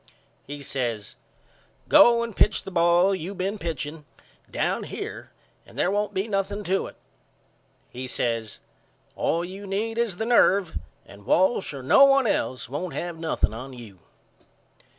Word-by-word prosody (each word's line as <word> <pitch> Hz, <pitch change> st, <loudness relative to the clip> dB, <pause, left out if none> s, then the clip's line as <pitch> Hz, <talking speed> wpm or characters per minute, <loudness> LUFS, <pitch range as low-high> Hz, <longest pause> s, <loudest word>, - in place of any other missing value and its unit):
He 145 Hz, 0 st, -7 dB
says 120 Hz, -7 st, -3 dB, 0.7 s
Go 235 Hz, -1 st, +6 dB
and 230 Hz, -3 st, -6 dB
pitch -, -, +2 dB
the 195 Hz, -, -8 dB
ball 175 Hz, +2 st, +4 dB
you 190 Hz, +2 st, -5 dB
been 195 Hz, +3 st, -3 dB
pitching 155 Hz, -2 st, -5 dB, 0.5 s
down -, -, -1 dB
here -, -, -7 dB, 0.3 s
and -, -, -17 dB
there 180 Hz, -, +1 dB
won't 205 Hz, +1 st, 0 dB
be 190 Hz, +3 st, -1 dB
nothing 200 Hz, 0 st, -2 dB
to 195 Hz, +1 st, 0 dB
it. -, -, -12 dB, 0.9 s
He 130 Hz, +1 st, -7 dB
says 115 Hz, -3 st, -2 dB, 0.5 s
All 170 Hz, +1 st, 0 dB
you 195 Hz, +3 st, -9 dB
need 220 Hz, +4 st, -2 dB
is 230 Hz, -6 st, 0 dB
the 220 Hz, -, -2 dB
nerve 200 Hz, -7 st, +3 dB, 0.3 s
and 100 Hz, 0 st, -15 dB
Walsh 190 Hz, +3 st, +2 dB
or 140 Hz, -3 st, -8 dB
no 205 Hz, -, +6 dB
one 275 Hz, -1 st, +4 dB
else 130 Hz, -, -1 dB
won't 155 Hz, +8 st, -5 dB
have 170 Hz, -2 st, -4 dB
nothing 160 Hz, -9 st, 0 dB
on 130 Hz, +4 st, -8 dB
you. 110 Hz, -7 st, -12 dB
175 Hz, 150 wpm, -25 LUFS, 135-200 Hz, 0.9 s, Go